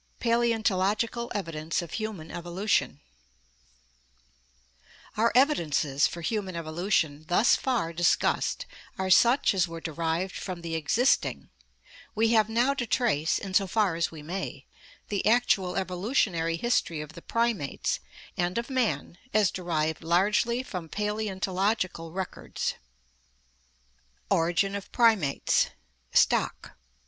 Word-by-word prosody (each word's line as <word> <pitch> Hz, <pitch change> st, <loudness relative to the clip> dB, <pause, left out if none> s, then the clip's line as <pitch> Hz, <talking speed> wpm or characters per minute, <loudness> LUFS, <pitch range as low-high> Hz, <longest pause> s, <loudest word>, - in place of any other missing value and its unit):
Paleontological 230 Hz, -1 st, +1 dB
Evidence 165 Hz, -3 st, -2 dB
of 170 Hz, -, -10 dB
Human 215 Hz, -8 st, -5 dB
Evolution 175 Hz, +4 st, -1 dB, 2.1 s
Our 230 Hz, +2 st, +3 dB
evidences 160 Hz, -, +3 dB
for 170 Hz, -, -7 dB
human 190 Hz, 0 st, -2 dB
evolution 160 Hz, -2 st, -1 dB
thus 210 Hz, +8 st, +4 dB
far 235 Hz, -11 st, -1 dB
discussed 175 Hz, +1 st, +1 dB, 0.3 s
are 190 Hz, 0 st, -1 dB
such 240 Hz, +7 st, +5 dB
as 185 Hz, -2 st, +2 dB
were 165 Hz, 0 st, -7 dB
derived 165 Hz, +3 st, -2 dB
from 180 Hz, -3 st, -6 dB
the 165 Hz, -1 st, -4 dB
existing; 215 Hz, -, +1 dB, 0.6 s
we 225 Hz, +1 st, +3 dB
have 220 Hz, -2 st, +3 dB
now 240 Hz, +5 st, +2 dB
to 255 Hz, -4 st, -3 dB
trace, 200 Hz, -, +1 dB
in 195 Hz, -1 st, -6 dB
so 195 Hz, 0 st, +3 dB
far 205 Hz, -2 st, +1 dB
as 165 Hz, 0 st, 0 dB
we 155 Hz, -2 st, -10 dB
may, 165 Hz, -4 st, -5 dB, 0.4 s
the 200 Hz, -2 st, -1 dB
actual 215 Hz, -6 st, +2 dB
evolutionary 180 Hz, -3 st, 0 dB
history 170 Hz, -6 st, 0 dB
of 150 Hz, +1 st, -7 dB
the 170 Hz, -, -11 dB
primates 230 Hz, -, -1 dB, 0.4 s
and 175 Hz, +2 st, -1 dB
of 235 Hz, +3 st, -3 dB
man 210 Hz, -, -1 dB, 0.2 s
as 210 Hz, -3 st, +4 dB
derived 160 Hz, -3 st, -2 dB
largely 205 Hz, +8 st, +2 dB
from 180 Hz, -9 st, -6 dB
paleontological 195 Hz, -4 st, -1 dB
records. 190 Hz, +1 st, -4 dB, 1.6 s
Origin 175 Hz, +4 st, +2 dB
of 200 Hz, -1 st, -6 dB
Primates 220 Hz, -, +3 dB, 0.4 s
Stock. -, -, +1 dB
190 Hz, 115 wpm, -27 LUFS, 165-220 Hz, 2.1 s, such